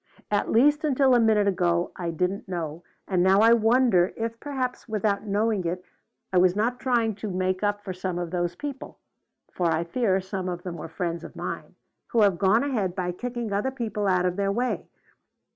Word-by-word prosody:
"At 205 - +1
least 290 +7 +4
until 270 -3 +3
a 245 - +5
minute 215 -3 +3
ago 175 -2 +1
I 175 -2 -3
didn't 180 +5 -2
know, 170 -2 -4 0.2
and 185 -2 +1
now 190 +2 +5
I 225 +1 +7
wonder 225 -5 +3
if 230 0 -3
perhaps, 260 -4 -4
without 210 -1 -1
knowing 205 0 +1
it, 180 +2 -3 0.5
I 180 - +5
was 180 0 +4
not 235 +4 0
trying 235 -4 +1
to 215 0 -5
make 185 0 -1
up 205 0 -1
for 190 - -4
some 185 -1 -3
of 175 -2 -4
those 175 -1 -1
people 280 +4 -7 0.6
for 175 - 0
I 165 0 +1
fear 190 +2 +1
some 190 -1 -4
of 175 -1 -5
them 180 -2 -5
were 160 - -7
friends 170 0 -3
of - - -10
mine - - -6 0.3
who 230 - +2
have 195 -4 +3
gone 205 +5 +4
ahead 215 -11 -1
by 180 -2 -1
kicking 240 +2 -4
other 205 +6 0
people 225 -6 -3
out 185 -1 +2
of 180 0 -1
their 200 -1 +1
way. 245 +5 -1
200 Hz, 200 wpm, -26 LUFS, 180-230 Hz, 0.6 s, I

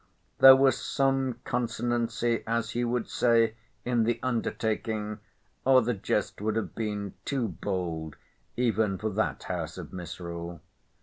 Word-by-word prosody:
There 135 0 +11
was 135 0 +3
some 135 -2 +1
consonancy 120 -1 0
(as 115 0 0
he 120 +2 -1
would 120 -1 -1
say) 115 -2 +3 0.3
in 120 -2 +2
the 120 +1 0
undertaking, 110 -3 -2 0.4
or 130 -1 +6
the 120 +2 0
jest 100 -1 -2
would 110 0 0
have 110 - -2
been 105 -3 -3
too 130 -6 -1
bold 85 -3 -3 0.4
even 110 -5 +1
for 110 +3 -2
that 110 +3 -1
house 85 -3 -4
of 90 -2 -8
misrule. 85 -1 -6
110 Hz, 135 wpm, -28 LUFS, 95-120 Hz, 0.4 s, There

